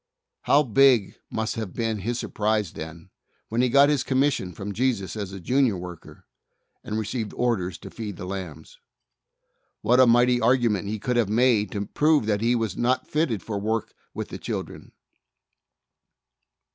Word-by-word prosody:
How 145 +1 +5
big 125 -4 +4 0.2
must 110 0 -2
have 110 -5 -4
been 115 -2 -2
his 115 +5 -2
surprise 105 -5 -1
then 80 +3 -9 0.4
when 115 +2 +1
he 125 - +2
got 140 +3 +6
his 145 -3 +2
commission 130 -8 +1
from 100 +4 -6
Jesus 110 -6 -1
as 100 -3 -5
a 95 - -7
Junior 125 +2 +1
worker, 90 -1 -10 0.6
and 105 - -4
received 110 0 -3
orders 100 -8 -1
to - - -11
feed 105 -5 -6
the - - -6
lambs! 90 -5 -7 1.0
What 120 +4 +4
a 130 - +7
mighty 120 +1 +4
argument 115 -4 +2
he 110 +2 -2
could 120 +4 -1
have 115 -4 +2
made 110 -2 +3
to 100 -1 -2
prove 150 +4 +2
that 105 -1 0
he 120 +2 +2
was 110 -4 -2
not 130 +2 0
fitted 130 - -1
for 105 -3 -3
work 110 +2 -2 0.2
with - - -6
the - - -7
children! - - -6
110 Hz, 165 wpm, -25 LUFS, 100-125 Hz, 1.0 s, a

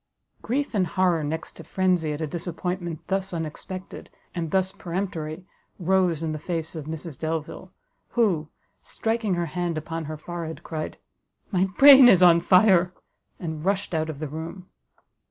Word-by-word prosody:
Grief 280 +4 -2
and 190 -4 +2
horror 180 -3 +1
next 160 +2 -4
to - - -9
frenzy 180 -4 +1
at 150 +1 -4
a - - 0
disappointment 175 +1 -4
thus 195 0 -2
unexpected, 170 +4 -6 0.2
and 170 -3 -3
thus 190 +2 +1
peremptory, 175 -3 -4 0.3
rose 180 -3 +1
in 160 - -1
the 155 - -4
face 165 0 -3
of 155 -4 -6
Mrs 160 -1 -7
Delvile, 160 -1 -4 0.4
who, 180 -10 +1 0.3
striking 225 -4 -1
her 175 0 -1
hand 175 0 -2
upon 165 +1 -4
her 155 +1 -5
forehead, 165 0 -6
cried, 155 -1 -5 0.5
"My 185 -2 +3
brain 275 -3 +10
is 185 -5 +6
on 170 -1 +7
fire!" 180 0 +4 0.4
and 160 -3 -5
rushed 195 0 -1
out 160 0 0
of 155 - -5
the 155 +1 -4
room. 165 +5 -7
175 Hz, 155 wpm, -25 LUFS, 160-185 Hz, 0.5 s, brain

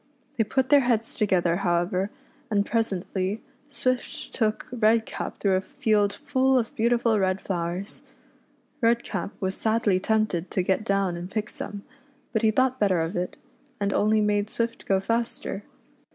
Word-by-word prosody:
They 225 - +4
put 260 +4 0
their 290 - +7
heads 235 -4 +1
to 210 - +3
gether, 175 -3 +2
however, 180 +1 0 0.4
and 205 -2 +2
presently 195 -2 -1 0.3
Swift 255 -3 -2
took 220 -3 0
Redcap 225 -2 +1
through 195 -2 +2
a - - -1
field 205 0 +1
full 265 0 +2
of 230 -2 -1
beautiful 235 -1 +2
red 190 0 +1
flowers. 180 +1 -4 0.8
Redcap 230 -6 +1
was 190 -1 -1
sadly 220 -3 +1
tempted 210 -4 0
to 185 - 0
get 190 +3 +1
down 195 -4 +1
and 175 +1 -6
pick 215 +1 -3
some, 205 -1 -6 0.5
but 220 - +1
he 220 - +4
thought 260 +3 +2
better 195 -4 +3
of 165 +5 -2
it, 180 0 -3 0.4
and 200 -1 0
only 215 +1 +3
made 205 0 +1
Swift 230 0 -3
go 195 -1 +3
faster. 230 -2 -2
210 Hz, 155 wpm, -26 LUFS, 190-230 Hz, 0.8 s, their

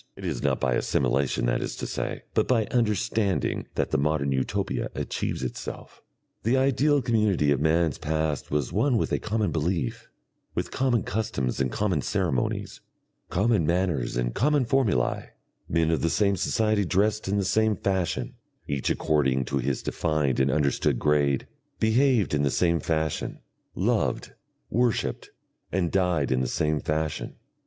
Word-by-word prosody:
It - - -9
is - - -2
not - - +1
by 65 - +1
assimilation, 65 +2 +1
that - - +1
is - - -4
to - - -5
say, - - -4
but - - +2
by 115 -4 +2
understanding 105 -3 0
that - - -1
the - - +2
modern 70 -1 +1
Utopia 65 -1 -1
achieves - - -3
itself. 65 - -6 0.4
The 120 +4 +2
ideal 140 +1 +3
community 105 - +2
of 70 - +2
man's 80 -1 +2
past 80 -2 -1
was 75 -3 -1
one 135 -4 +2
with - - -1
a - - +1
common 105 -1 -1
belief, 80 -3 -2 0.5
with - - -2
common 125 -5 +1
customs 70 - -2
and 65 -2 0
common 95 -5 0
ceremonies, 65 -2 -1 0.5
common 100 0 +2
manners 85 -9 0
and - - -1
common 145 +3 +2
formulae; 115 - 0 0.4
men 80 0 +2
of 80 - +1
the 85 - +1
same 100 +2 +2
society 110 +2 +1
dressed 100 +4 +1
in 100 +2 +1
the 100 - 0
same 110 +2 +2
fashion, 95 -3 -1 0.3
each 70 -2 -1
according 65 -4 +1
to 70 +2 -1
his 65 +1 -2
defined 75 -5 0
and 65 +1 +3
understood 70 -1 +1
grade, 70 -1 +2 0.3
behaved 115 - +3
in 75 - +2
the 70 - +2
same 85 +3 +2
fashion, 80 0 -2 0.4
loved, - - 0 0.4
worshipped, 120 -1 0 0.4
and 90 -2 0
died 90 -8 +1
in 65 0 +2
the 65 - 0
same 75 +2 0
fashion. 75 +1 -2
85 Hz, 155 wpm, -26 LUFS, 70-110 Hz, 0.5 s, ideal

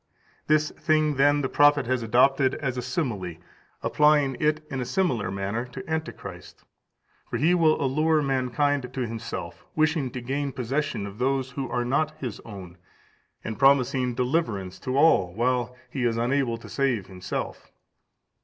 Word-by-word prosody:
This 155 0 +3
thing, 155 -2 +1
then, 145 +1 +4
the 135 - 0
prophet 145 0 +4
has 130 0 0
adopted 130 +4 +3
as 130 -3 -3
a 125 - -2
simile, 120 - -3 0.5
applying 150 -3 +3
it 155 0 +1
in 135 -2 -2
a - - 0
similar 125 - 0
manner 100 +4 -2
to 125 +10 -9
Antichrist. 160 0 -6 0.7
For - - -2
he 165 +5 +3
will 160 -3 +3
allure 155 +3 +2
mankind 135 0 0
to 130 0 -4
himself, 115 0 -6
wishing 155 -3 +1
to 125 - -6
gain 135 +3 -3
possession 135 -2 -2
of 100 +2 -9
those 130 0 0
who 135 -2 -4
are 120 0 -1
not 155 +5 0
his 120 -6 -5
own, 95 -5 -10 0.6
and 110 -2 -5
promising 130 -2 +3
deliverance 120 - -1
to 130 +1 -2
all, 115 - +4
while 125 +1 0 0.2
he 130 - -2
is 115 -1 +1
unable 120 0 +1
to 115 - -12
save 130 -8 0
himself. 90 -1 -6
130 Hz, 155 wpm, -26 LUFS, 120-145 Hz, 0.7 s, then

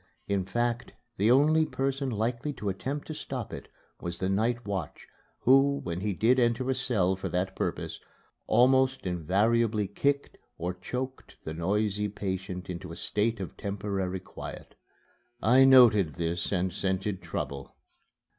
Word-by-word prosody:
In 100 -2 0
fact 120 +4 -1 0.2
the 105 +4 +3
only 150 +5 +5
person 135 -2 -1
likely 120 +5 -2
to 105 -6 -3
attempt 135 +10 -4
to 155 - -5
stop 130 -6 -5
it - - -7 0.3
was 85 -1 -5
the 95 +1 -1
night 115 +5 0
watch, 95 -7 -4 0.4
who, 135 +2 +5
when 85 +1 -3
he 105 +1 0
did 115 +7 +3
enter 120 +1 +1
a - - +3
cell 120 -9 +1
for 95 - -5
that 95 +1 -1
purpose, - - -3 0.5
almost 130 0 +4
invariably 105 +5 +1
kicked 140 +8 -1 0.2
or 90 +2 -2
choked 125 +9 -6
the 80 - -5
noisy 105 +4 0
patient 95 -2 -4
into 90 -1 -6
a - - -7
state 110 +1 0
of 95 - -6
temporary 100 -2 -3
quiet. - - -9 0.7
I 125 +4 +6
noted 115 - +6
this 85 0 -2
and 95 -1 0
scented 95 0 -1
trouble. 70 -5 -5
105 Hz, 145 wpm, -29 LUFS, 95-125 Hz, 0.7 s, I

